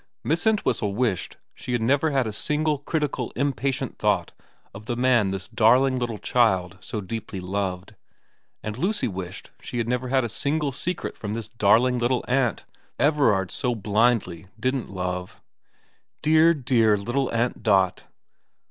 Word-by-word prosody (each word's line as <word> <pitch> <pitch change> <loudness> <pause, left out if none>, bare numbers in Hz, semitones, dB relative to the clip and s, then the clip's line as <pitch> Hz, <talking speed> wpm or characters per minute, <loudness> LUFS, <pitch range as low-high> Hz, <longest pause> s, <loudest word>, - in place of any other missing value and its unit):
Miss 165 +8 0
Entwhistle 120 - +1
wished 115 -6 -1 0.2
she 125 - -6
had 120 - 0
never 140 +6 +2
had 135 -3 +1
a 110 - -4
single 150 +5 0
critical 145 -4 -2
impatient 135 -1 -1
thought - - +1 0.4
of 105 +2 -11
the 120 - -1
man 120 -5 +3
this 95 -1 -4
darling 125 +4 +3
little 120 -3 -2
child 95 -7 +1
so 105 - -5
deeply 105 0 -6
loved, 95 +1 -3 0.7
and 110 +2 -5
Lucy 190 -4 0
wished 95 -2 -7
she 120 - -6
had 115 -1 -1
never 125 +1 -1
had 130 0 +2
a - - -1
single 145 +5 -1
secret 180 +7 -4
from 105 -1 -5
this 110 -1 -5
darling 120 +3 +3
little 120 +1 0
aunt 125 -2 0 0.3
Everard 135 - +2
so 125 -1 -1
blindly 105 -4 +1
didn't 130 +2 -1
love. 90 -1 -4 0.8
Dear, 160 +2 +5
dear 120 -6 +3
little 120 +7 -1
Aunt 120 +1 -1
Dot. 95 -4 +2
120 Hz, 150 wpm, -24 LUFS, 100-135 Hz, 0.8 s, Dear